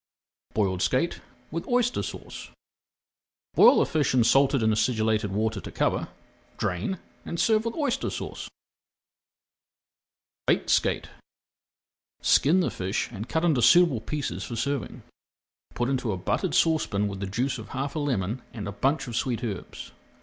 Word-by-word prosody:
BOILED 95 Hz, -4 st, +1 dB
SKATE 130 Hz, -, 0 dB, 0.3 s
WITH 165 Hz, +2 st, -4 dB
OYSTER 245 Hz, 0 st, +1 dB
SAUCE -, -, -7 dB, 1.0 s
Boil -, -, +7 dB
the -, -, +4 dB
fish 145 Hz, -5 st, 0 dB
in 125 Hz, -, +5 dB
salted 135 Hz, +1 st, +4 dB
and 110 Hz, 0 st, +3 dB
acidulated 110 Hz, -2 st, +1 dB
water 110 Hz, 0 st, -1 dB
to -, -, -8 dB
cover, -, -, 0 dB, 0.5 s
drain, 95 Hz, -, -2 dB, 0.3 s
and 170 Hz, -, -5 dB
serve 220 Hz, 0 st, +3 dB
with 230 Hz, -, -2 dB
Oyster 285 Hz, -6 st, -1 dB
Sauce. -, -, -6 dB, 2.0 s
BAKED -, -, +2 dB
SKATE -, -, +1 dB, 1.1 s
Skin 170 Hz, +7 st, +4 dB
the -, -, 0 dB
fish 95 Hz, +5 st, -2 dB
and 110 Hz, +1 st, -7 dB
cut 160 Hz, +8 st, 0 dB
into 150 Hz, -7 st, +3 dB
suitable 170 Hz, -6 st, +5 dB
pieces 115 Hz, -, -3 dB
for 120 Hz, -, -5 dB
serving. 140 Hz, -1 st, -3 dB, 0.7 s
Put 120 Hz, -, 0 dB
into 130 Hz, -4 st, -1 dB
a 95 Hz, -, -2 dB
buttered 90 Hz, -, -1 dB
saucepan 150 Hz, -11 st, +2 dB
with 100 Hz, -1 st, -5 dB
the 100 Hz, -, -3 dB
juice 125 Hz, +6 st, -1 dB
of 110 Hz, -, -9 dB
half 140 Hz, +3 st, -4 dB
a -, -, -1 dB
lemon 120 Hz, -5 st, -1 dB
and 105 Hz, -4 st, -5 dB
a -, -, -3 dB
bunch 135 Hz, +10 st, 0 dB
of 120 Hz, -3 st, -6 dB
sweet 125 Hz, 0 st, -1 dB
herbs. 100 Hz, -6 st, -6 dB
120 Hz, 150 wpm, -26 LUFS, 105-150 Hz, 2.0 s, Boil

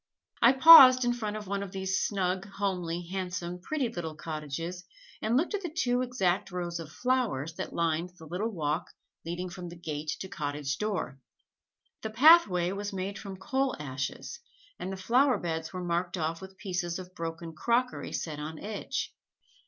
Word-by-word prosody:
I 240 Hz, -, +7 dB
paused 260 Hz, -3 st, +10 dB
in 240 Hz, -, +2 dB
front 215 Hz, -3 st, -4 dB
of 210 Hz, -, -7 dB
one 200 Hz, +1 st, -2 dB
of 200 Hz, -2 st, -6 dB
these 190 Hz, 0 st, -1 dB
snug, 190 Hz, -1 st, -1 dB
homely, 180 Hz, -4 st, -2 dB
handsome, 180 Hz, -2 st, -4 dB
pretty 285 Hz, +5 st, -1 dB
little 170 Hz, -8 st, -5 dB
cottages 160 Hz, +3 st, -5 dB, 0.4 s
and 225 Hz, +3 st, +2 dB
looked 330 Hz, +8 st, 0 dB
at 410 Hz, -, -1 dB
the 350 Hz, -, -4 dB
two 250 Hz, -6 st, 0 dB
exact 210 Hz, -7 st, 0 dB
rows 175 Hz, -2 st, -4 dB
of 155 Hz, -2 st, -8 dB
flowers 235 Hz, -, 0 dB
that -, -, -4 dB
lined 170 Hz, +1 st, -1 dB
the 160 Hz, -, -12 dB
little 180 Hz, +8 st, -2 dB
walk 155 Hz, -3 st, -2 dB, 0.4 s
leading 175 Hz, +2 st, -3 dB
from 180 Hz, -1 st, -7 dB
gate 155 Hz, -3 st, -6 dB
to 190 Hz, -, -5 dB
cottage 145 Hz, -4 st, -3 dB
door. 200 Hz, -10 st, -2 dB, 0.8 s
The 220 Hz, -, -3 dB
pathway 215 Hz, -, +6 dB
was 205 Hz, +1 st, -4 dB
made 195 Hz, +1 st, -4 dB
from 195 Hz, -2 st, -8 dB
coal 265 Hz, +8 st, -1 dB
ashes 140 Hz, -, -5 dB, 0.4 s
and 190 Hz, -, -4 dB
the 190 Hz, -, -5 dB
flowerbeds 185 Hz, -, +1 dB
were 185 Hz, -1 st, -5 dB
marked 175 Hz, +1 st, -1 dB
off 165 Hz, +1 st, -2 dB
with 190 Hz, 0 st, -11 dB
pieces 175 Hz, -4 st, -3 dB
of 185 Hz, -1 st, -9 dB
broken 165 Hz, 0 st, -6 dB
crockery 240 Hz, +9 st, 0 dB
set 155 Hz, -3 st, -4 dB
on 155 Hz, +1 st, -6 dB
edge. 210 Hz, -, -4 dB
185 Hz, 170 wpm, -29 LUFS, 165-220 Hz, 0.8 s, paused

